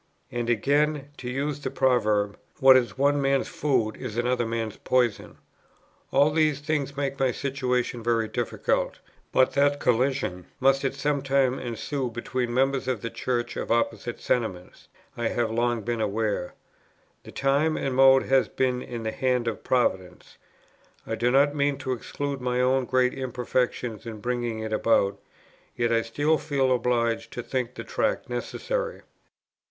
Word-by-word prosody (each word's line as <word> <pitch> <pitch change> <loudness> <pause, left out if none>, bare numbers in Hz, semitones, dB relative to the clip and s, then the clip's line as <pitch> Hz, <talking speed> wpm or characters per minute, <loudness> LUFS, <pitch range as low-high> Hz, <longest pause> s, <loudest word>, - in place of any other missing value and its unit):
And 120 -1 -2
again 145 +5 +1
(to 125 - -6
use 140 +3 -2
the - - -3
proverb) 105 -5 +1 0.2
what 135 0 +8
is 125 -1 +1
one 140 +1 +3
man's 135 -1 +1
food 130 -7 0
is 115 -4 -6
another 120 0 +1
man's 115 -2 -3
poison. 125 -5 0 0.7
All 140 +2 +4
these 155 -2 +2
things 145 -2 -2
make 140 -1 -2
my 135 -1 +2
situation 125 -2 -1
very 115 -1 +1
difficult. - - -1 0.3
But 130 - +3
that 145 0 +3
collision 125 -8 0
must 135 +1 +3
at 135 0 -1
some 145 0 0
time 135 -1 +1
ensue 125 +3 -3
between 120 +1 -3
members 135 +1 +1
of 125 -5 -1
the 115 - -4
Church 120 -2 -2
of - - -4
opposite 120 0 0
sentiments, 95 -7 -3 0.3
I 120 -1 -1
have 115 -2 -1
long 120 0 0
been 115 0 -2
aware. 105 -3 -1 0.7
The - - -12
time 140 +3 +1
and 135 - -2
mode 135 0 +6
has 135 -1 +3
been 125 -1 0
in 120 -2 -6
the 110 - -2
hand 125 -2 0
of 115 - -3
Providence; 95 -8 -1 0.7
I - - -4
do 120 +2 +1
not 140 +3 +4
mean 145 -1 +1
to 130 - -2
exclude 140 +2 -4
my 125 0 0
own 130 +1 +2
great 125 0 +2
imperfections 125 -3 -2
in 110 -2 -6
bringing 120 -1 -2
it 110 0 -4
about; 105 -2 +2 0.6
yet 120 -1 +1
I 115 - +3
still 145 +7 +1
feel 135 -4 +1
obliged 120 -1 0
to 120 - -5
think 125 -1 -3
the - - -6
Tract - - -1
necessary." - - -3
125 Hz, 160 wpm, -26 LUFS, 115-135 Hz, 0.7 s, what